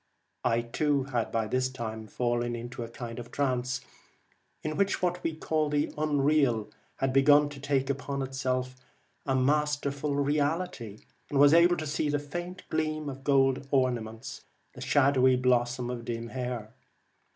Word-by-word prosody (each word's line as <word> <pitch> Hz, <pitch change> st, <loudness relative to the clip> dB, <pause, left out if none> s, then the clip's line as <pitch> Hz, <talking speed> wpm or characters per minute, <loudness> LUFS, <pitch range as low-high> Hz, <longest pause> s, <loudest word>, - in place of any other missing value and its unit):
I 115 Hz, -1 st, +2 dB
too 140 Hz, +4 st, 0 dB
had 125 Hz, -4 st, -2 dB
by 115 Hz, -1 st, 0 dB
this 130 Hz, +3 st, 0 dB
time 110 Hz, -4 st, -6 dB
fallen 120 Hz, +2 st, -1 dB
into 120 Hz, +1 st, -6 dB
a 115 Hz, -, -5 dB
kind 115 Hz, 0 st, -7 dB
of 120 Hz, 0 st, -8 dB
trance, 125 Hz, -2 st, -1 dB, 0.8 s
in 155 Hz, 0 st, -2 dB
which 200 Hz, +4 st, +1 dB
what 180 Hz, 0 st, -1 dB
we 165 Hz, -, -1 dB
call 155 Hz, -1 st, 0 dB
the 145 Hz, 0 st, 0 dB
unreal 145 Hz, -7 st, +2 dB, 0.2 s
had 135 Hz, -1 st, -1 dB
begun 145 Hz, +2 st, +5 dB
to 145 Hz, -1 st, -10 dB
take 135 Hz, -1 st, 0 dB
upon 140 Hz, 0 st, -2 dB
itself 130 Hz, -1 st, -2 dB, 0.5 s
a 135 Hz, -, +2 dB
masterful 145 Hz, +1 st, +1 dB
reality, 145 Hz, -, -1 dB, 0.3 s
and 145 Hz, -, -1 dB
was 145 Hz, +1 st, +7 dB
able 175 Hz, +1 st, +6 dB
to 155 Hz, -, -3 dB
see 150 Hz, 0 st, -1 dB
the 145 Hz, -, +1 dB
faint 175 Hz, +5 st, -6 dB
gleam 155 Hz, -1 st, -1 dB
of 135 Hz, 0 st, -8 dB
golden 135 Hz, -1 st, +2 dB
ornaments, 120 Hz, -5 st, -1 dB, 0.3 s
the -, -, -11 dB
shadowy 130 Hz, -2 st, +4 dB
blossom 125 Hz, -1 st, +1 dB
of 120 Hz, -1 st, -6 dB
dim 115 Hz, 0 st, -4 dB
hair. 125 Hz, -3 st, -4 dB
135 Hz, 155 wpm, -29 LUFS, 120-145 Hz, 0.8 s, was